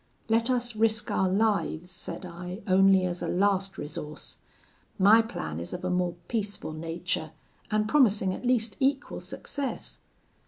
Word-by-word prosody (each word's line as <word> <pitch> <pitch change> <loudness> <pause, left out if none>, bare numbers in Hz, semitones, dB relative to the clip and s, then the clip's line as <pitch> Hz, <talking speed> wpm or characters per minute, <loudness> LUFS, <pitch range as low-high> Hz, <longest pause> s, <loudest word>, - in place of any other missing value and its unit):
'Let 230 +2 +3
us 240 -2 0
risk 220 0 +2
our 190 - +2
lives,' 195 -4 0
said 185 +1 -6
I, 180 +3 -7
'only 190 -1 +5
as 180 -1 -3
a - - -2
last 195 0 +1
resource. 150 0 -5 0.6
My 210 +3 +7
plan 80 - -5
is 85 - -6
of 180 +1 -5
a 185 - 0
more 180 -1 0
peaceful 205 -7 -3
nature, 165 0 -3 0.4
and 215 -1 +1
promising 210 -8 +4
at - - -7
least 235 -4 +1
equal 275 +1 0
success.' 280 -3 -4
195 Hz, 150 wpm, -28 LUFS, 180-225 Hz, 0.6 s, My